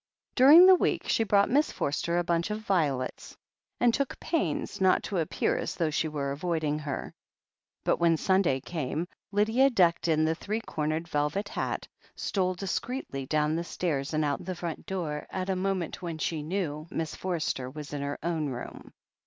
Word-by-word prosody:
During 295 +8 +9
the 375 - +9
week 365 - +1
she 225 - +2
brought 200 -1 +4
Miss 290 +4 +3
Forster 170 +4 -1
a 175 - +2
btmch 170 +1 0
of 210 +1 -3
violets, 150 -11 -1 0.4
and 240 -1 +4
took 280 +1 -1
pains 190 - -2
not 185 -1 +4
to 195 - -2
appear 160 - 0
as - - -3
though 160 -2 0
she 155 +2 0
were 145 -3 -3
avoiding 155 0 -1
her. 150 -3 -5 0.7
But - - +2
when 170 -1 +4
Sunday 185 -8 +2
came, 155 +2 -3 0.2
Lydia, 220 +7 +4
decked 175 -9 +3
in 155 -1 +3
the 160 - +2
three 210 +6 -3
cornered 155 -2 -2
velvet 150 +7 -1
hat, - - -3 0.3
stole 185 -2 -1
discreetly 190 - -4
down 150 +1 +1
the 170 - -1
stairs 155 -5 -2
and 155 -1 +1
out 145 +2 0
of 180 - -12
the 185 - -2
front 170 +2 -5
door 170 -7 -3
at 190 0 -2
a - - 0
moment 185 -2 -2
when 170 -3 -4
she 155 0 -2
knew 155 -2 -3
that - - -11
Miss 160 -1 -2
Forster 160 -8 -2
was 150 +1 -8
in 145 - -3
her 140 0 -3
own 160 -3 -1
room. 120 -2 -8
170 Hz, 185 wpm, -28 LUFS, 150-195 Hz, 0.7 s, During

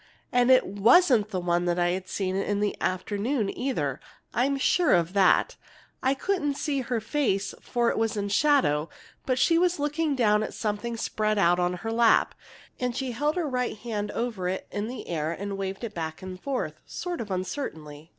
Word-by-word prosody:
And 245 0 +3
it 260 -1 +6
wasn't 220 - +4
the 190 -4 -2
one 175 0 0
I'd 175 +2 0
seen 190 -1 -2
in 200 +1 -1
the 205 0 0
afternoon, 205 +4 -1
either. 150 - -2 0.3
I'm 275 +3 +1
sure 335 - +3
of 170 +1 0
that. 200 - +3 0.4
I 265 +1 +2
couldn't 295 -2 -1
see 285 -1 -1
her 245 -2 -2
face, 220 -4 -1
for 240 -1 +1
it - - -2
was 225 -1 0
in 200 0 -2
shadow, 205 - +3 0.4
but 255 -1 +1
she 330 +5 +4
was 360 0 +2
looking 295 +1 0
down 210 -4 +3
at 215 - -4
something 220 +2 -3
spread 215 -1 -1
out 175 -2 +4
on 180 0 +1
her 225 - -1
lap. 230 0 +4 0.5
And 250 -1 -1
she 260 -2 -2
held 295 +6 0
her 350 -4 -1
right 250 -4 -2
hand 210 -2 -4
over 220 -7 -2
it 190 - -3
in 205 +1 -3
the 250 +2 -7
air 160 -2 -2
and 200 +3 -4
waved 195 +2 -4
it 225 -2 -4
back 160 +1 -5
and 185 -1 -8
forth, 275 -2 -3
sort 355 -1 -4
of 215 - -6
uncertainly. 165 - -5
215 Hz, 190 wpm, -27 LUFS, 185-260 Hz, 0.5 s, it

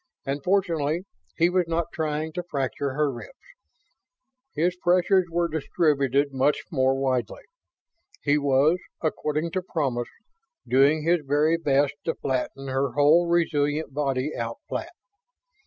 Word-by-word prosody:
And, 140 0 -3
fortunately, 170 -4 +1 0.3
he 170 - +4
was 180 0 +1
not 165 0 -1
trying 155 0 -2
to 180 - -3
fracture 140 -4 -3
her 150 -1 +1
ribs. 120 - -10 1.2
His 175 +3 +1
pressures 180 +1 +3
were 170 +1 0
distributed 145 -3 +1
much 135 +3 +1
more 130 -3 +2
widely. 130 -5 -1 0.8
He 145 0 +3
was, 145 +5 +3 0.2
according 155 0 -1
to 185 - -1
promise, 135 -9 -2 0.6
doing 140 +5 +4
his 170 +2 +3
very 145 +3 +2
best 145 -3 +1
to 165 - -1
flatten 135 +1 -3
her 135 -1 -1
whole 155 +4 +4
resilient 155 -3 0
body 140 0 -1
out 115 0 -4
flat. 340 +1 -5
150 Hz, 130 wpm, -25 LUFS, 135-170 Hz, 1.2 s, he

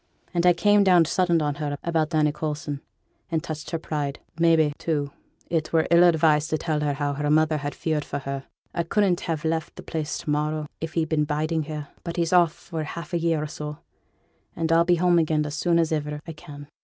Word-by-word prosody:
An' 175 - +2
I 180 - +7
came 205 +4 +4
down 180 -3 +5
sudden 170 -1 +2
on 145 -1 -1
her 145 -1 -2
about 165 -1 0
Annie 150 -1 +3
Coulson, 150 -1 -4 0.5
and 160 -1 -1
touched 155 -2 -6
her 165 - -1
pride. 150 -3 -3 0.2
Maybe, 165 -3 +4
too, 145 -4 -1 0.4
it 160 -2 -1
were 160 -1 +2
ill 170 +1 +7
advised 160 -3 +4
to 155 - +1
tell 155 -1 -1
her 150 -1 0
how 145 0 -1
her 145 +1 -2
mother 155 0 +3
was 145 - -3
feared 155 -2 -1
for - - -4
her. 140 -1 -5 0.3
I 170 - 0
couldn't 180 +1 +1
ha' 165 -1 -3
left 160 0 -1
the - - -10
place 155 -2 -3
to - - -7
morrow 150 +1 0
if 160 0 -5
he'd 160 -2 0
been 150 -2 +2
biding 155 +1 -1
here; 150 -2 -6
but 170 -1 -5
he's 170 0 0
off 175 -3 +5
for 165 -3 -6
half 170 +3 -7
a 170 - +2
year 165 -2 +1
or - - -3
so, 150 0 -6 0.8
and 165 0 -1
I'll 165 +1 +5
be 175 0 +4
home 175 0 +3
again 155 -1 +1
as 150 - -5
soon 170 +2 +1
as 165 -1 +2
iver 150 -1 -2
I 165 - -6
can. 145 -1 -11
155 Hz, 225 wpm, -25 LUFS, 150-170 Hz, 0.8 s, I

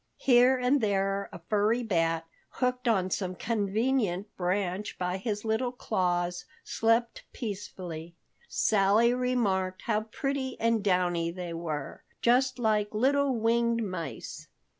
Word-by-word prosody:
Here 255 0 +5
and 250 +2 +2
there 195 -1 0
a - - -8
furry 215 +3 +2
bat, 165 -5 0 0.2
hooked 250 0 -1
on 190 -5 +2
some 185 -1 -2
convenient 210 -1 -1
branch 185 +2 -2
by 180 0 -1
his 205 +2 -3
little 220 +3 0
claws, 175 -6 -1 0.2
slept 230 +1 +1
peacefully. 180 -7 -6 0.3
Sally 215 +3 +3
remarked 210 -7 0
how 215 -2 +1
pretty 265 +4 -3
and 230 -2 +1
downy 180 -3 +1
they 175 -1 -5
were, 155 -4 -5 0.2
just 255 +2 +3
like 215 -3 0
little 275 +3 +2
winged 230 +1 +1
mice. 185 -5 -6
210 Hz, 120 wpm, -29 LUFS, 185-240 Hz, 0.3 s, Here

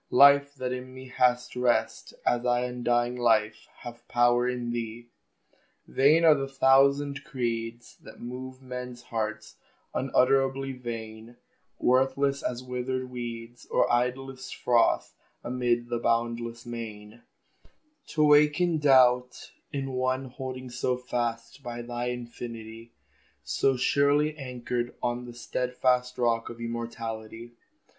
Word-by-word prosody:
Life 140 +1 +6
that 130 -1 -3
in 130 0 -7
me 130 0 -10
has 125 -1 +1
rest, 120 -3 0
As 120 0 +2
I 120 0 +2
undying 120 0 0
Life 110 -3 +1
have 120 -1 -10
power 120 0 +3
in 120 -1 -3
thee! 120 0 -5 0.8
Vain 155 +5 +4
are 160 - +8
the 135 -2 -2
thousand 140 +1 +3
creeds 120 -4 -4
That - - -13
move 130 +2 -8
men's 125 -1 -7
hearts: 110 -1 -4 0.4
unutterably 135 +1 +2
vain; 115 -2 -7 0.4
Worthless 135 +2 +2
as 125 0 -3
withered 125 0 -3
weeds, 120 -1 -7
Or - - +2
idlest 130 +2 -2
froth 120 -2 +2 0.3
amid 120 -1 0
the 120 -1 -1
boundless 115 0 -1
main, 115 -1 -8 0.9
To 155 - +1
waken 150 +3 +4
doubt 125 -3 +4 0.2
in 135 -2 -3
one 130 +1 -1
Holding 130 -1 -7
so 125 0 -1
fast 120 0 -3
by 120 -2 -6
thine 120 +1 -3
infinity; 115 -2 -7 0.5
So 135 -1 +1
surely 145 +3 +2
anchored 125 -3 -4
on 120 0 -1
The 120 - -9
stedfast 125 +1 0
rock 115 -2 +1
of 120 - -9
immortality. 115 -1 -6
125 Hz, 120 wpm, -27 LUFS, 120-130 Hz, 0.9 s, are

